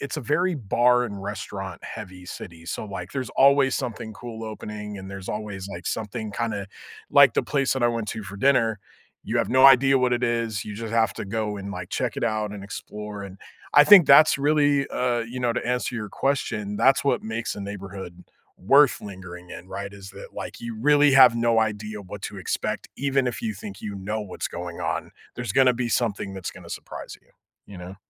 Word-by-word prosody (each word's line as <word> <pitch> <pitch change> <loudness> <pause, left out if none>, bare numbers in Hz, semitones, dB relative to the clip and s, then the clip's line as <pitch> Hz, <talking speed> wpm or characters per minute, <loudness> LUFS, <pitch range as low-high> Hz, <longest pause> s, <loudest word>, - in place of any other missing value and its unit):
it's 140 +3 -4
a - - -3
very 170 +7 +1
bar 125 +2 +3
and 100 -4 -6
restaurant 95 -2 -6
heavy 95 -4 -8
city, 85 -3 -9
so, 110 - -4
like, 95 -3 -7
there's 130 -4 -3
always 140 -1 +5
something 110 -2 -5
cool 115 0 -8
opening, 105 -1 -7
and 95 0 -9
there's 100 -1 -8
always, 105 -2 -5
like, 100 - -8
something 110 0 -3
kinda, 105 -3 -3 0.4
like 140 -4 +7
the - - +2
place 135 +2 0
that 130 - -2
I 120 - +5
went 115 -2 -3
to 110 -1 -4
for 100 +1 -8
dinner, 115 -4 +2 0.5
you - - -2
have - - 0
no 130 +1 +7
idea 135 0 +6
what 125 -1 +2
it 120 +1 0
is, 115 -3 -1
you 105 - -7
just 115 +1 -6
have 115 -1 +2
to - - -5
go 105 0 -3
and, 100 +1 -6
like, 90 -1 -7
check - - -2
it - - -1
out 110 -2 -1
and 100 -1 -8
explore, 105 0 -7
and 95 -1 -10 0.4
I 145 - +9
think 195 -5 +9
that's 140 +1 +7
really, 145 -1 +3
uh, 125 -1 0
you 115 +2 -6
know, 120 -1 +1
to - - -3
answer 125 0 -1
your 110 -3 -4
question, 105 -7 -2
that's 135 +4 +4
what 140 - +1
makes 110 +1 -3
a 100 - -7
neighborhood 95 -3 -8 0.3
worth 140 +6 +4
lingering 90 -3 -10
in, 90 +1 -10
right? 100 0 -6
Is 100 -1 -11
that, - - -11
like, - - -7
you 115 -1 -5
really 145 +1 +5
have 130 -3 +8
no 115 -1 +2
idea 105 -1 -3
what 100 +1 -9
to 100 - -6
expect 95 - -3
even 135 -1 +1
if 125 - -3
you 220 -2 -1
think 210 -2 -9
you 105 -2 -5
know 105 +3 -3
what's 95 - -5
going 85 -1 -7
on, - - -2 0.2
there's 120 -5 -4
gonna 130 -1 +5
be 120 0 -2
something 100 -5 -1
that's 95 - -5
gonna - - -13
surprise - - -8
you, - - -33 0.4
you 100 - -11
know? 90 +2 -9
110 Hz, 215 wpm, -24 LUFS, 100-125 Hz, 0.5 s, I